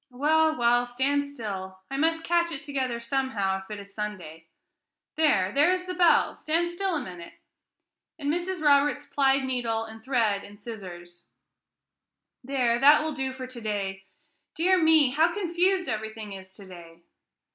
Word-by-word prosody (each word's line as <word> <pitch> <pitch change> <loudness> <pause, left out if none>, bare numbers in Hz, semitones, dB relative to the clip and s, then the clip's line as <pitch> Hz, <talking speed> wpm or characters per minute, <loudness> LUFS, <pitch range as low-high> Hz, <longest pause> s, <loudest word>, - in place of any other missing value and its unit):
"Well, 310 +5 +2
well, 240 0 +2
stand 275 +4 0
still; 195 -8 -7
I - - -3
must 325 +3 +1
catch 340 0 +1
it 275 - -4
together 260 -4 -3
somehow, 235 -6 -1
if 190 - -16
it 210 -1 -6
is 200 0 -13
Sunday. 185 -7 -7 0.7
There! 285 -12 +2
there 290 +7 +4
is 365 0 -1
the 365 - -4
bell! 350 -1 +3
Stand 335 +2 0
still 370 0 -1
a - - 0
minute!" 175 -2 -10 0.8
and 290 -1 -1
Mrs. 350 -1 -3
Roberts 290 0 +3
plied 275 -1 +2
needle, 240 -4 -2
and 220 0 -11
thread, 225 -6 0
and 205 0 -13
scissors; 175 -6 -10 1.2
"there, 245 -3 +1
that 295 +3 +6
will 315 0 -2
do 265 -2 -3
for 260 0 -7
to 255 -2 -10
day. 195 -3 -4 0.5
Dear 365 +2 +3
me, 315 -4 +5
how 320 +5 +3
confused 365 0 0
everything 220 -1 -5
is 190 -1 -11
to 200 - -13
day!" 170 -2 -14
260 Hz, 160 wpm, -26 LUFS, 205-310 Hz, 1.2 s, that